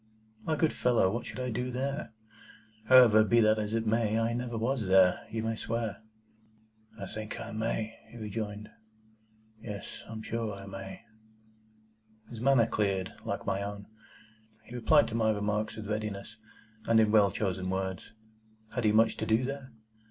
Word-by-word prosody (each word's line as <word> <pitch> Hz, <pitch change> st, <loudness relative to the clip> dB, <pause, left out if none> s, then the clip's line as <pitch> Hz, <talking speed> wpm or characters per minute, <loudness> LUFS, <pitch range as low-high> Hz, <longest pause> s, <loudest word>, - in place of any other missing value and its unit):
"My 160 Hz, -, 0 dB
good 155 Hz, +1 st, +1 dB
fellow, 120 Hz, -6 st, +2 dB
what 120 Hz, +3 st, -3 dB
should -, -, -7 dB
I 125 Hz, -1 st, -2 dB
do 125 Hz, +3 st, -2 dB
there? 135 Hz, +4 st, -3 dB, 0.7 s
However, 115 Hz, -3 st, +7 dB
be 120 Hz, +2 st, +3 dB
that 110 Hz, 0 st, +4 dB
as 105 Hz, +1 st, -2 dB
it 115 Hz, 0 st, -1 dB
may, 110 Hz, 0 st, +1 dB
I 115 Hz, +1 st, +1 dB
never 120 Hz, -1 st, -3 dB
was 115 Hz, -1 st, -1 dB
there, 95 Hz, -1 st, +4 dB
you 110 Hz, 0 st, -3 dB
may 115 Hz, 0 st, -1 dB
swear." 115 Hz, -2 st, -3 dB, 1.0 s
"I 100 Hz, -, -4 dB
think 110 Hz, +2 st, -6 dB
I -, -, -6 dB
may," 110 Hz, 0 st, -3 dB
he 120 Hz, -, -12 dB
rejoined. 105 Hz, -1 st, -5 dB, 0.9 s
"Yes; 105 Hz, -3 st, -7 dB
I -, -, -7 dB
am 110 Hz, 0 st, -6 dB
sure 115 Hz, -3 st, -3 dB
I 100 Hz, 0 st, -10 dB
may." 95 Hz, 0 st, -8 dB, 1.3 s
His 115 Hz, -2 st, -7 dB
manner 135 Hz, -3 st, +5 dB
cleared, 100 Hz, -4 st, -1 dB
like -, -, -3 dB
my 95 Hz, -, -1 dB
own. 100 Hz, 0 st, -5 dB, 0.8 s
He 115 Hz, -, -13 dB
replied 145 Hz, +5 st, +4 dB
to -, -, -7 dB
my 110 Hz, -1 st, +2 dB
remarks 105 Hz, 0 st, -1 dB
with 110 Hz, -2 st, -7 dB
readiness, 105 Hz, 0 st, -4 dB, 0.5 s
and 115 Hz, -1 st, +5 dB
in 110 Hz, -1 st, +4 dB
well 105 Hz, -2 st, +5 dB
chosen 95 Hz, -1 st, -2 dB
words. 95 Hz, 0 st, -3 dB, 0.6 s
Had 125 Hz, -3 st, -1 dB
he 105 Hz, -, +5 dB
much 110 Hz, +1 st, +4 dB
to -, -, -3 dB
do 110 Hz, +3 st, +3 dB
there? 135 Hz, -1 st, -6 dB
110 Hz, 170 wpm, -30 LUFS, 105-115 Hz, 1.3 s, However